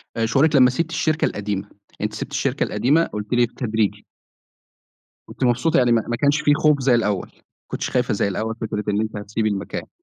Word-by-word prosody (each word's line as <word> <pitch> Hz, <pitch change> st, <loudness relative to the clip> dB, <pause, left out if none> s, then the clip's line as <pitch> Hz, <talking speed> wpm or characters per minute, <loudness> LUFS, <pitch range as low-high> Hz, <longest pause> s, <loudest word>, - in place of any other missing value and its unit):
آآ 115 Hz, -, 0 dB
شعورِك 145 Hz, +6 st, +3 dB
لمّا 130 Hz, -2 st, +7 dB
سِبتِ 165 Hz, +6 st, -2 dB
الشركة 155 Hz, -1 st, +1 dB
القديمة؟ 100 Hz, -1 st, -3 dB, 0.3 s
أنتِ -, -, -2 dB
سِبتِ -, -, -6 dB
الشركة -, -, 0 dB
القديمة 150 Hz, +7 st, +2 dB
قُلتِ 105 Hz, -3 st, -5 dB
لي 120 Hz, 0 st, +4 dB
بالتدريجي 110 Hz, -3 st, -2 dB, 1.2 s
كنتِ -, -, -6 dB
مبسوطة، 125 Hz, +6 st, +2 dB
يعني 125 Hz, -1 st, +3 dB
ما 115 Hz, -2 st, +3 dB
ما 120 Hz, -, -1 dB
كانش 145 Hz, +4 st, +2 dB
في 145 Hz, -, +4 dB
خوف 150 Hz, -1 st, +3 dB
زي 125 Hz, -2 st, +4 dB
الأول، 105 Hz, -5 st, 0 dB
ما -, -, -29 dB, 0.3 s
كنتيش -, -, -4 dB
خايفة -, -, 0 dB
زي -, -, 0 dB
الأول 110 Hz, +3 st, -3 dB
فكرة 105 Hz, -1 st, -3 dB
إن 105 Hz, +1 st, +1 dB
أنتِ 110 Hz, -1 st, -4 dB
هتسيبي 110 Hz, +2 st, -2 dB
المكان. 100 Hz, -2 st, -4 dB
120 Hz, 200 wpm, -22 LUFS, 105-140 Hz, 1.2 s, لمّا